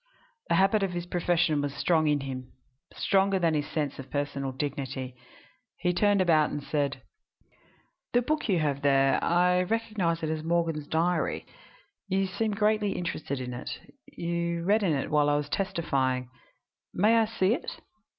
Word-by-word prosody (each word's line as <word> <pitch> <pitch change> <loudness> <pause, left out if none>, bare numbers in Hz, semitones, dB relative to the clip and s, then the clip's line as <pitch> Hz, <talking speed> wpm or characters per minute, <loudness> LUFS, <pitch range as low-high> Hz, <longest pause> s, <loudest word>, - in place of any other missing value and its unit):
The - - +3
habit 195 +2 +3
of 195 -2 -1
his 175 0 -3
profession 175 -3 +1
was 145 -1 -3
strong 160 -1 +2
in 145 -1 +2
him 130 -2 -6 0.4
stronger 195 0 +2
than 170 -3 +2
his 150 -1 -1
sense 145 -4 -3
of 135 0 -8
personal 140 -1 -2
dignity. 130 -1 -4 0.6
He 180 -1 0
turned 205 +1 +3
about 160 -4 +4
and 145 - -5
said: 145 -1 -2 1.1
"The 245 0 +3
book 305 +5 0
that 250 - -6
you 190 - +3
have 145 -3 0
there 135 -1 +3
I 180 +1 +3
recognize 190 -5 -1
it 155 - 0
as 155 -1 -3
Morgan's 165 -3 0
diary. 170 +3 0 0.6
You 195 0 +1
seemed 205 +2 -2
greatly 210 -1 +2
interested 155 -6 -3
in 125 -1 -5
it; 120 - -6 0.3
you 170 0 -2
read 210 +5 +3
in 180 -6 +2
it 135 - -2
while 150 -1 +3
I 145 - +3
was 145 0 -3
testifying. 135 -9 -1 0.7
May 215 +5 +4
I 225 - +4
see 215 -2 +1
it? - - -5
170 Hz, 170 wpm, -28 LUFS, 145-190 Hz, 1.1 s, about